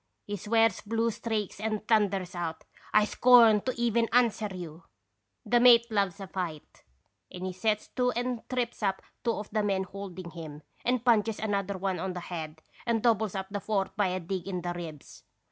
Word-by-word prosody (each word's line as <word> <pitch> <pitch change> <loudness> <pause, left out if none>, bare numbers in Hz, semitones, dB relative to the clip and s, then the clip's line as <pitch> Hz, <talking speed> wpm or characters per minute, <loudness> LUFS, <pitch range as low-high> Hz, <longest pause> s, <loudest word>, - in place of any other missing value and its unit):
He 205 - -4
swears 225 +1 +2
blue 225 +2 0
streaks 215 -3 -3
and 215 0 -3
thunders 200 -5 +2
out: 165 -2 -4 0.2
' - - -27
I 210 0 +5
scorn 230 -2 +6
to 255 - -2
even 235 -1 +2
answer 235 -3 +3
you! 175 -3 -8 0.2
' - - -51
" - - -51
The 240 - +3
mate 235 -1 +6
loves 200 -2 0
a 195 - -5
fight, 175 -5 -6 0.5
and 185 0 -6
he 185 - -3
sets 210 +3 0
to 250 -1 +1
and 245 0 -2
trips 245 -2 -2
up 195 -2 -1 0.2
two 235 - +1
of 210 -1 -6
the 215 - +1
men 195 -2 0
holding 190 -2 -8
him, 155 -3 -9 0.2
and 245 -1 0
punches 225 -2 +3
another 200 -2 -1
on 190 -1 -1
the 180 - -5
head 160 -3 -7 0.2
and 230 -2 +1
doubles 220 -4 +2
up 190 0 -4
the 205 - -2
fourth 195 -3 -1
by 205 -2 +2
a 185 0 -1
dig 185 +1 -4
in 180 -3 -3
the 175 0 -2
ribs. 165 -4 -9
205 Hz, 195 wpm, -29 LUFS, 185-225 Hz, 0.5 s, scorn